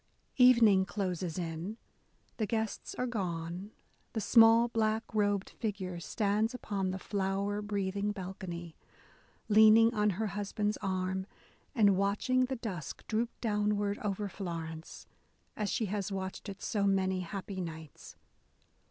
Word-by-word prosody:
* -, -, -39 dB
Evening 220 Hz, -6 st, +6 dB
closes 185 Hz, -4 st, -3 dB
in; 170 Hz, +4 st, -4 dB, 0.6 s
the 215 Hz, -, -1 dB
guests 220 Hz, 0 st, -3 dB
are 250 Hz, -, -1 dB
gone; 180 Hz, -4 st, -3 dB, 0.4 s
the 225 Hz, -, -1 dB
small 230 Hz, +1 st, +6 dB
black 220 Hz, -1 st, 0 dB
robed 205 Hz, -2 st, +1 dB
figure 190 Hz, -5 st, -4 dB
stands 215 Hz, +6 st, 0 dB
upon 200 Hz, -6 st, -2 dB
the 185 Hz, -, -2 dB
flower 200 Hz, +1 st, -1 dB
breathing 200 Hz, 0 st, -1 dB
balcony, 180 Hz, -4 st, -6 dB, 0.7 s
leaning 220 Hz, +2 st, +7 dB
on 210 Hz, -1 st, +2 dB
her 220 Hz, -, 0 dB
husband's 205 Hz, +1 st, -1 dB
arm, 190 Hz, -1 st, -2 dB, 0.5 s
and 205 Hz, -5 st, +5 dB
watching 210 Hz, +6 st, +2 dB
the 265 Hz, +1 st, -3 dB
dusk 190 Hz, -, -6 dB
droop 230 Hz, +2 st, 0 dB
downward 210 Hz, -2 st, 0 dB
over 205 Hz, 0 st, -2 dB
Florence, 165 Hz, -4 st, -6 dB, 0.5 s
as 210 Hz, -2 st, -2 dB
she 225 Hz, -, 0 dB
has 205 Hz, 0 st, -3 dB
watched 190 Hz, +1 st, -5 dB
it 195 Hz, 0 st, -8 dB
so 205 Hz, -2 st, 0 dB
many 190 Hz, -1 st, +1 dB
happy 190 Hz, +2 st, -5 dB
nights. 160 Hz, -3 st, -8 dB
200 Hz, 130 wpm, -32 LUFS, 185-215 Hz, 0.7 s, leaning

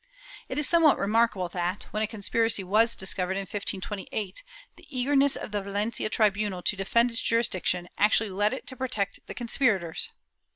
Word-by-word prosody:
^ -, -, -33 dB, 0.5 s
It -, -, -4 dB
is 295 Hz, -, +2 dB
somewhat 330 Hz, -4 st, +5 dB
remarkable 210 Hz, -3 st, +1 dB
that, 180 Hz, +2 st, -2 dB
when 215 Hz, -, -2 dB
a 215 Hz, -, +1 dB
conspiracy 220 Hz, 0 st, +2 dB
was 215 Hz, +5 st, +2 dB
discovered 190 Hz, -1 st, -1 dB
in -, -, -1 dB
1528, 195 Hz, 0 st, -3 dB, 0.3 s
the -, -, -18 dB
eagerness 275 Hz, +1 st, +2 dB
of -, -, -6 dB
the 205 Hz, -1 st, -1 dB
Valencia 205 Hz, +3 st, -2 dB
tribunal 205 Hz, -4 st, +1 dB
to -, -, +1 dB
defend 235 Hz, +5 st, +2 dB
its 230 Hz, -, +1 dB
jurisdiction 185 Hz, -6 st, 0 dB
actually 210 Hz, 0 st, +3 dB
led 205 Hz, +3 st, +1 dB
it 265 Hz, -, -6 dB
to 260 Hz, -, -5 dB
protect 225 Hz, -6 st, -2 dB
the -, -, -7 dB
conspirators. 225 Hz, -8 st, +1 dB
210 Hz, 170 wpm, -27 LUFS, 195-235 Hz, 0.5 s, somewhat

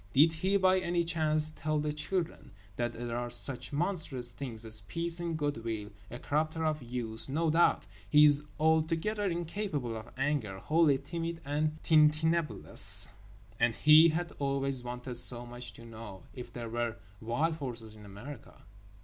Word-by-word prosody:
Did 155 Hz, +4 st, +5 dB
he, 190 Hz, +5 st, +1 dB
by 185 Hz, -1 st, +3 dB
any 175 Hz, -1 st, 0 dB
chance, 155 Hz, -2 st, +1 dB
tell 155 Hz, 0 st, -2 dB
the 150 Hz, 0 st, -1 dB
children 155 Hz, -, -3 dB, 0.2 s
that 120 Hz, +1 st, -2 dB
there 120 Hz, 0 st, -5 dB
are 120 Hz, 0 st, -3 dB
such 120 Hz, +1 st, -1 dB
monstrous 145 Hz, -7 st, 0 dB
things 115 Hz, -5 st, -6 dB
as 110 Hz, -1 st, 0 dB
peace 165 Hz, -, +1 dB
and 170 Hz, -2 st, -3 dB
good 145 Hz, -6 st, -3 dB
will… 110 Hz, -2 st, -4 dB, 0.2 s
a 120 Hz, -, -6 dB
corrupter 155 Hz, +4 st, -2 dB
of 155 Hz, -1 st, -1 dB
youth, 120 Hz, -1 st, +2 dB
no 160 Hz, +3 st, 0 dB
doubt… 170 Hz, +2 st, +3 dB, 0.2 s
he 150 Hz, +6 st, +7 dB
is 145 Hz, 0 st, +5 dB, 0.2 s
altogether 165 Hz, +6 st, +1 dB
incapable 170 Hz, -, -3 dB
of 110 Hz, -1 st, -8 dB
anger, 135 Hz, -8 st, -1 dB
wholly 155 Hz, +5 st, +2 dB
timid 165 Hz, +4 st, -5 dB
and 150 Hz, +2 st, -1 dB
tintinnabulous. 155 Hz, +1 st, +3 dB, 0.5 s
And 115 Hz, -1 st, +2 dB
he 155 Hz, +2 st, +7 dB
had 175 Hz, +2 st, -2 dB
always 135 Hz, -2 st, -1 dB
wanted 125 Hz, 0 st, -6 dB
so 120 Hz, 0 st, +2 dB
much 120 Hz, 0 st, -7 dB
to 115 Hz, +3 st, -13 dB
know—if 115 Hz, +1 st, -10 dB
there 120 Hz, -2 st, -7 dB
were 120 Hz, 0 st, -2 dB, 0.3 s
wild 150 Hz, +9 st, -1 dB
horses 115 Hz, -6 st, -3 dB
in 105 Hz, -, -14 dB
America? 105 Hz, +6 st, -11 dB
145 Hz, 160 wpm, -30 LUFS, 120-160 Hz, 0.5 s, he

